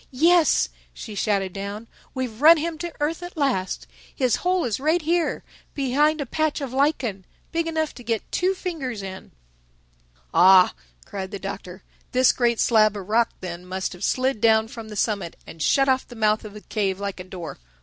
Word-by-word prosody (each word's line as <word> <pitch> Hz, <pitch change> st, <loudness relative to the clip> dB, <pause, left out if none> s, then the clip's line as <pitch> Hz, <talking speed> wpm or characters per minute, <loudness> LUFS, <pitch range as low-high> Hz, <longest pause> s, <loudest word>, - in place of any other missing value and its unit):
"Yes," 330 Hz, +5 st, +4 dB, 0.3 s
she 215 Hz, -, -8 dB
shouted 195 Hz, -2 st, 0 dB
down, 200 Hz, +2 st, -5 dB, 0.3 s
"we've 255 Hz, -3 st, -4 dB
run 325 Hz, +3 st, +9 dB
him 320 Hz, 0 st, -3 dB
to 345 Hz, 0 st, -4 dB
earth 310 Hz, +4 st, -1 dB
at 350 Hz, 0 st, -8 dB
last. 255 Hz, -11 st, -1 dB, 0.3 s
His 255 Hz, -4 st, +2 dB
hole 360 Hz, -1 st, +1 dB
is 230 Hz, -2 st, -1 dB
right 310 Hz, +5 st, +2 dB
here, 335 Hz, +2 st, 0 dB, 0.3 s
behind 295 Hz, +3 st, +2 dB
a 285 Hz, -, -2 dB
patch 310 Hz, +4 st, -1 dB
of 270 Hz, -3 st, -5 dB
lichen—big 275 Hz, -, -1 dB
enough 315 Hz, -1 st, -1 dB
to 245 Hz, -, -12 dB
get 225 Hz, -2 st, -3 dB
two 370 Hz, +2 st, +1 dB
fingers 270 Hz, -, -4 dB
in." 190 Hz, 0 st, -8 dB, 1.0 s
"Ah," 185 Hz, 0 st, +7 dB, 0.3 s
cried 190 Hz, -1 st, -5 dB
the 200 Hz, -, -5 dB
Doctor, 190 Hz, -1 st, -7 dB, 0.3 s
"this 255 Hz, 0 st, +5 dB
great 235 Hz, -2 st, +1 dB
slab 215 Hz, -3 st, +4 dB
of 190 Hz, -2 st, -7 dB
rock 230 Hz, +1 st, +3 dB
then 175 Hz, -1 st, -6 dB
must 185 Hz, +1 st, -4 dB
have 180 Hz, +2 st, -10 dB
slid 255 Hz, -2 st, 0 dB
down 220 Hz, -1 st, +4 dB
from 225 Hz, -2 st, -9 dB
the 210 Hz, -, -8 dB
summit 200 Hz, -5 st, -1 dB
and 160 Hz, -, -11 dB
shut 275 Hz, -, +3 dB
off 260 Hz, -1 st, +2 dB
the 245 Hz, -, -11 dB
mouth 215 Hz, -1 st, +2 dB
of 210 Hz, -, -9 dB
the 210 Hz, -, -9 dB
cave 195 Hz, -4 st, -2 dB
like 200 Hz, -1 st, -4 dB
a -, -, -5 dB
door. 180 Hz, -, -8 dB
230 Hz, 185 wpm, -24 LUFS, 200-295 Hz, 1.0 s, run